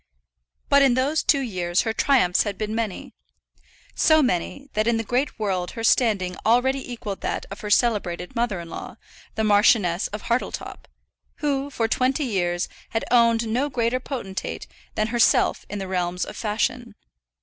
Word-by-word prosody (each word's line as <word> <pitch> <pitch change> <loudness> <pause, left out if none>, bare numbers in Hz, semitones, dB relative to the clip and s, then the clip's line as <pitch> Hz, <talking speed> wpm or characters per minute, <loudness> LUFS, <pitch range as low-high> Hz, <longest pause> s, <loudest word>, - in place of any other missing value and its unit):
But 280 0 +5
in 265 -3 +4
those 280 +5 +1
two 280 - +2
years 180 -7 0
her 225 -2 -2
triumphs 225 -8 +3
had 205 -2 -2
been 215 0 -3
many; 220 -4 -4 0.8
so 315 -1 +4
many, 250 +4 -2
that 215 +1 0
in 235 -1 +3
the 225 - -2
great 250 +6 -1
world 190 -4 -2
her 225 - -4
standing 205 -7 +2
already 255 +3 +2
equalled 210 -5 -6
that - - -3
of 200 - -7
her 210 - -5
celebrated 205 -3 +1
mother 230 -6 0
in 170 - -8
law, - - -8 0.4
the 220 - 0
Marchioness 205 -4 +3
of 210 0 -7
Hartletop, 235 +1 -3 0.5
who, 285 -1 -1
for 230 -5 -1
twenty 260 +5 +1
years, 175 -6 -1 0.2
had 225 - -2
owned 230 -1 +4
no 250 +6 0
greater 240 -1 0
potentate 240 -8 -5 0.3
than 215 +1 0
herself 240 0 +2
in 205 - -4
the 195 -1 -5
realms 180 -1 -1
of - - -9
fashion. 225 +1 -2
225 Hz, 165 wpm, -24 LUFS, 195-250 Hz, 0.8 s, But